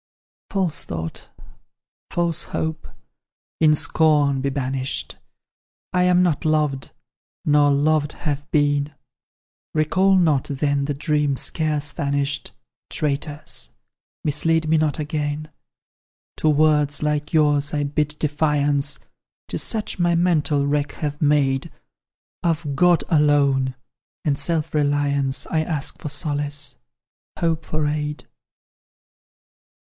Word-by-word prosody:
"False 175 -7 -1
thought 80 -1 -6 0.8
false 170 -2 0
hope 160 0 -3 0.7
in 155 -1 +5
scorn 145 -3 +2
be 140 - 0
banished! 135 -1 -2 0.8
I 180 0 +3
am 180 0 +4
not 175 -3 +1
loved 150 -4 0 0.6
nor 145 -1 +4
loved 145 +1 +2
have 145 -2 -4
been; 145 0 +1 0.8
Recall 185 +5 +3
not, 155 -7 +3
then, 140 0 0
the 145 0 -2
dreams 150 -1 0
scarce 150 -2 -1
vanished; 140 -2 -1 0.4
Traitors! 145 0 -3 0.5
mislead 160 +2 +2
me 160 0 +3
not 150 -3 0
again! 150 0 -3 0.9
"To 155 - +2
words 150 -1 +3
like 150 0 -1
yours 145 -2 +2
I 145 -1 0
bid 150 +1 -1
defiance, 145 -1 +1 0.5
'Tis - - -1
such 215 -4 -2
my 175 -1 +3
mental 155 -5 +2
wreck 145 0 0
have 145 -1 -4
made; 145 0 +2 0.7
Of 160 -4 -1
God 175 +2 +4
alone, 140 -4 +3 0.5
and 145 -2 +2
self 165 +1 -2
reliance, 145 -2 +1
I 160 - 0
ask 155 -3 -3
for 150 - -4
solace 145 -1 -2 0.6
hope 165 -2 0
for 155 -1 -1
aid. 150 0 -3
150 Hz, 110 wpm, -22 LUFS, 145-155 Hz, 0.9 s, in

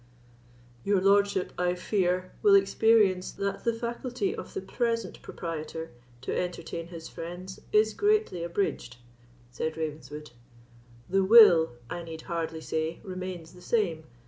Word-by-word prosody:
"Your 200 -1 +2
lordship, 200 0 +2
I 180 0 +1
fear, 185 -1 0
will 410 -2 +6
experience 220 - +3
that 200 0 -3
the 235 - +2
faculty 245 - -3
of 445 - -9
the 390 - -2
present 230 - -2
proprietor 165 -1 -6 0.3
to 130 - -3
entertain 170 -1 -4
his 165 -2 -9
friends 180 +3 -8
is 215 0 +4
greatly 415 - +1
abridged," 170 -8 -2 0.5
said 160 +5 -3
Ravenswood; 150 -1 -6 0.8
"the 195 +1 +2
will, 190 - +7
I 175 - -5
need 165 -1 -8
hardly 165 -2 -3
say, 160 +1 -2
remains 185 -3 -6
the 180 - -15
same. 180 -6 0
180 Hz, 130 wpm, -28 LUFS, 165-210 Hz, 0.8 s, will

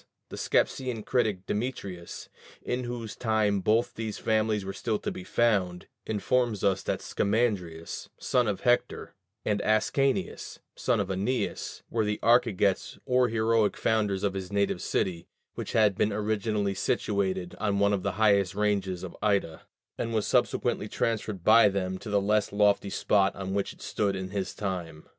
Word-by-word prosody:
The - - -7
Scepsian 125 -5 0
critic 110 -7 0
Demetrius 100 -6 -4 0.4
(in 125 0 -2
whose 120 -3 -5
time 110 -3 +1
both 110 +5 +1
these 110 -2 -4
families 110 -2 0
were 95 - -4
still 110 0 -1
to - - -4
be 90 - -7
found) 95 -5 +1 0.2
informs 110 0 0
us 95 -1 +2
that - - -2
Scamandrius, 100 -7 -1
son 125 -2 +1
of 100 -2 -2
Hector, 125 0 +1 0.3
and 105 -1 +1
Ascanius, 135 +6 0 0.2
son - - +1
of - - -1
Æneas, 100 +7 -2
were 115 -1 +1
the 105 0 -1
archegets 115 -5 +2
or 125 -1 +3
heroic 110 -1 +2
founders 105 -3 +1
of 100 -2 +1
his 95 -1 -5
native 100 0 0
city, 85 -3 -1 0.3
which - - -6
had 105 -2 +4
been 105 - +1
originally 105 -1 -1
situated 95 -2 -1
on 100 -2 0
one 100 0 +3
of 100 - 0
the - - -2
highest 100 -4 +3
ranges 100 -3 0
of 95 - -7
Ida, 100 -6 0 0.3
and 115 -1 -2
was 110 - +1
subsequently - - +1
transferred 110 -5 -2
by 110 0 +7
them 95 -1 -2
to 110 - -8
the 105 0 +3
less 105 +1 +1
lofty 100 -1 +2
spot 100 0 +2
on 95 0 -4
which 100 0 -1
it - - -14
stood 100 -2 -1
in 95 0 -5
his 95 -2 -3
time. 85 -6 -4
105 Hz, 160 wpm, -28 LUFS, 95-110 Hz, 0.4 s, by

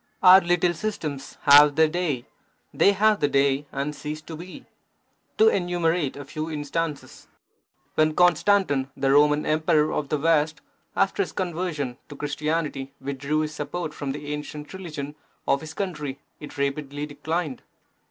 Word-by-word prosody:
Our 185 +1 +9
little 175 0 +2
systems 155 -8 -5
have 145 0 +8
their 160 0 +5
day; 155 -7 -2 0.5
They 200 - +4
have 215 +1 +3
their 145 - +2
day 140 +1 +2
and 140 +2 -3
cease 150 +1 -5
to 160 - -8
be. 175 +3 -10 0.7
To 440 - +6
enumerate 175 - +1
a 145 - -7
few 155 +3 -5
instances. 150 0 -4 0.7
When 155 0 +2
Constantine, 180 -5 +3
the 135 0 +1
Roman 150 +1 +4
Emperor 155 0 +2
of 145 -2 -2
the 150 - +1
West, 155 0 +2 0.4
after - - +1
his - - -3
conversion 170 -8 -3
to 145 - -9
Christianity, 145 -1 -3
withdrew 140 +3 -2
his 155 0 -3
support 155 +2 -4
from 140 -2 -4
the 145 +1 -5
ancient 150 +1 -7
religion 155 -6 -6 0.3
of 140 - +2
his 160 0 -9
country, 150 -8 -4 0.2
it 150 - -10
rapidly 140 +1 -2
declined. 150 -1 -3
150 Hz, 150 wpm, -25 LUFS, 145-170 Hz, 0.7 s, Our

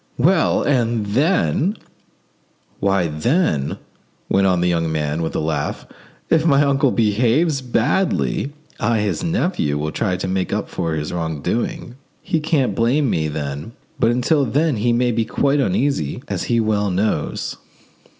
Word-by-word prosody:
"Well, 165 +6 +3
and 120 -5 +1
then——" 145 - +1 1.0
"Why, 95 -2 +2
then," 80 - 0 0.5
went 95 0 +3
on 90 -2 +2
the 90 - +2
young 85 -2 0
man, 75 0 -1
with 80 - -3
a - - +1
laugh, 80 0 -2 0.4
"if 160 -1 +3
my 145 -3 +4
uncle 140 0 +2
behaves 120 +8 +2
badly, 130 +4 0 0.3
I, 115 +1 +1
his 105 - -1
nephew, 170 - 0
will 75 +1 -2
try 95 -2 -1
to 90 - -3
make 95 0 -1
up - - -2
for 80 -1 -2
his 75 +1 -4
wrong 80 -4 -3
doing: 120 +3 -3 0.3
he 165 - 0
can't 150 - +1
blame 125 +5 +2
me 80 -1 0
then. 75 +5 -5 0.3
But 115 - +3
until 125 +5 +2
then 140 +3 +1
he 120 +3 +1
may 120 +1 +2
be 115 0 +1
quite 140 +5 +1
easy, 140 - 0
as - - -3
he 115 - +1
well 105 -2 +1
knows." 95 -4 -1
115 Hz, 155 wpm, -20 LUFS, 85-140 Hz, 1.0 s, my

